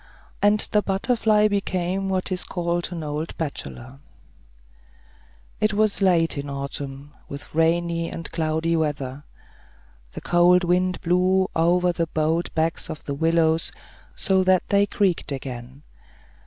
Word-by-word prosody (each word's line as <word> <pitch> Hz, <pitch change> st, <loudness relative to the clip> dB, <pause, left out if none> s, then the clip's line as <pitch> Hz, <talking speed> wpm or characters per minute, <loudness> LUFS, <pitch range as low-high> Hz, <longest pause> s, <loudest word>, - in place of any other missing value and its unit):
And 205 Hz, +1 st, +4 dB
the 210 Hz, -, +3 dB
butterfly 210 Hz, +1 st, +2 dB
became 195 Hz, -1 st, -1 dB
what 190 Hz, 0 st, -1 dB
is 180 Hz, -1 st, -1 dB
called 175 Hz, -1 st, -2 dB
an 170 Hz, -2 st, -5 dB
old 150 Hz, +2 st, -4 dB
bachelor. 135 Hz, -4 st, -6 dB, 1.6 s
It 215 Hz, -1 st, +1 dB
was 215 Hz, -1 st, +2 dB
late 165 Hz, -5 st, +3 dB
in 140 Hz, -, -5 dB
the 140 Hz, -, -5 dB
autumn, 140 Hz, +1 st, -6 dB, 0.2 s
with 140 Hz, 0 st, -9 dB
rainy 165 Hz, +1 st, +1 dB
and 165 Hz, -, -7 dB
cloudy 160 Hz, 0 st, 0 dB
weather. 145 Hz, -3 st, -2 dB, 0.9 s
The -, -, -7 dB
cold 175 Hz, +1 st, +4 dB
wind 180 Hz, +1 st, +1 dB
blew 185 Hz, +2 st, +2 dB
over 175 Hz, +2 st, +3 dB
the 165 Hz, -1 st, -2 dB
bowed 160 Hz, +2 st, 0 dB
backs 160 Hz, +1 st, -1 dB
of 155 Hz, -, -7 dB
the 140 Hz, -, -4 dB
willows, 160 Hz, +1 st, +2 dB, 0.4 s
so 190 Hz, -2 st, +2 dB
that 185 Hz, -1 st, +2 dB
they 200 Hz, 0 st, +3 dB
creaked 190 Hz, -7 st, 0 dB
again. 130 Hz, 0 st, -7 dB
170 Hz, 135 wpm, -23 LUFS, 155-185 Hz, 1.6 s, And